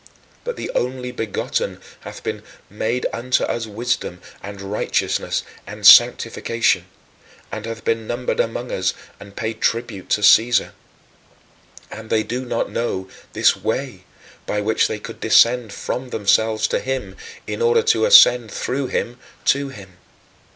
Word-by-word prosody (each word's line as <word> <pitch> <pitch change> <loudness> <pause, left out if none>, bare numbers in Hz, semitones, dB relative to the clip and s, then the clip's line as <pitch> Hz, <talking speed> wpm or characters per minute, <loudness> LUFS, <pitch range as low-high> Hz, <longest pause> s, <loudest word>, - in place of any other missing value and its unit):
But 485 -1 -4
the - - -5
Only 125 0 -2
Begotten 115 -4 -3 0.2
hath - - -10
been - - -4 0.3
"made 115 +4 -2
unto 125 +2 0
us 115 -1 -2
wisdom, 110 -4 -3 0.2
and 100 0 -8
righteousness, 100 +2 -1 0.2
and - - -7
sanctification" 115 -1 +5 0.6
and 110 +1 -6
hath 115 0 -6
been 115 -1 -1
numbered 120 +1 -3
among 120 +2 -2
us 90 -1 -1 0.2
and 100 0 -13
paid 110 0 -4
tribute 115 -5 -2
to 105 - +1
Caesar. 115 +3 +4 1.2
And 110 0 -9
they 110 -1 +2
do 125 +4 -4
not - - -2
know 95 -5 -3 0.2
this - - +4
"Way" 110 -6 -4 0.4
by 105 - -1
which 110 +2 +1
they 110 - -4
could 115 +2 -10
descend 115 0 +4
from 125 +5 -5
themselves 110 0 +1
to - - 0
him 130 0 -4 0.3
in - - -5
order 465 -1 +3
to 450 0 +2
ascend 125 - +7
through 135 +1 -3
him 120 0 -3 0.3
to 140 0 +2
him. 95 -7 -13
115 Hz, 145 wpm, -20 LUFS, 105-125 Hz, 1.2 s, ascend